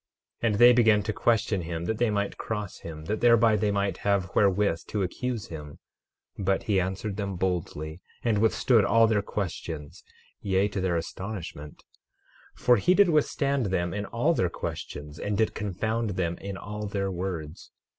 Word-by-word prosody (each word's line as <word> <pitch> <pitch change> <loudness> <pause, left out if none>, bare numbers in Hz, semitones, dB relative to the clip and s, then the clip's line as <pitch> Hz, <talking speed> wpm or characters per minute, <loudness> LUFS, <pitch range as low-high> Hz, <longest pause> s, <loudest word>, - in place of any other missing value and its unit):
12:19 115 - +2
And 105 - 0
they 120 +2 +8
began 110 -4 +4
to 110 - -2
question 110 -4 +1
him, 85 0 -4
that 110 +3 -2
they 120 - +3
might 100 -1 -1
cross 105 -3 -5
him, 80 -2 -8
that 110 +6 -2
thereby 115 -2 +5
they 105 0 +1
might 100 -1 0
have 100 -2 0
wherewith 100 -3 +3
to 105 -2 -1
accuse 115 +4 -3
him; 75 -3 -8 0.6
but 95 -1 +1
he 100 -3 +2
answered 95 +2 -3
them 100 -2 -3
boldly, 85 -3 -3 0.2
and 110 -3 +2
withstood 110 +1 +3
all 115 +2 +5
their 110 -2 +2
questions, 80 -7 -5 0.4
yea, 95 0 +2
to 100 -1 -3
their 90 -2 +1
astonishment; 85 -4 -6 0.7
for 125 -1 +4
he 180 +1 +3
did 200 -2 +5
withstand 140 -4 +1
them 90 -2 -1
in 105 0 -3
all 145 +9 +1
their 90 - +1
questions, 75 -2 -6
and 100 -1 -2
did 110 0 +1
confound 110 +3 -2
them 85 -2 -1
in 100 -1 -6
all 105 +1 -5
their 100 -1 -2
words. 85 -3 -5
100 Hz, 175 wpm, -27 LUFS, 90-110 Hz, 0.7 s, they